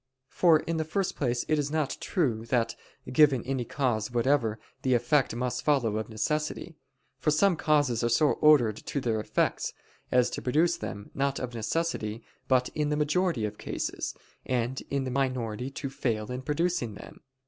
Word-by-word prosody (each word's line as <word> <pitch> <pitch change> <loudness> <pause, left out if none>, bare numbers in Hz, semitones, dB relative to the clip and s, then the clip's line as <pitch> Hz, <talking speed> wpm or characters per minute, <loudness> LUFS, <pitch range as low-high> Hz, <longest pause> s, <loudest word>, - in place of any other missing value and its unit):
For 165 -4 +4
in 165 0 -2
the 160 - 0
first 180 +5 -2
place 120 -3 -1
it 155 -1 +2
is 145 -1 -1
not 155 -2 -1
true 120 -11 0
that, 115 -1 +1 0.4
given 135 -3 +5
any 130 -1 -2
cause 115 -5 -1
whatever, 120 -2 +1 0.2
the 130 -1 +2
effect 120 +1 +2
must 125 0 -2
follow 120 -8 +2
of 110 - -4
necessity. 150 +8 -2 0.4
For - - +1
some 175 +5 +4
causes 145 -7 +2
are 120 - +2
so 145 +6 +4
ordered 130 -9 +4
to 140 - -4
their 115 -4 0
effects, 105 - 0 0.4
as 125 -1 +3
to - - -4
produce 155 +7 +2
them, 100 0 -7
not 140 0 0
of 125 -1 -4
necessity, 115 -2 -2 0.2
but 125 -1 +3
in 150 -1 -1
the 150 - 0
majority 150 -4 +1
of 105 0 -6
cases, - - -3 0.3
and 125 +1 -1
in 140 -1 0
the 130 - -3
minority 125 -3 -1
to 135 0 -5
fail 115 -4 -2
in 125 +1 -4
producing 150 - -1
them. - - -12
130 Hz, 175 wpm, -28 LUFS, 115-150 Hz, 0.4 s, given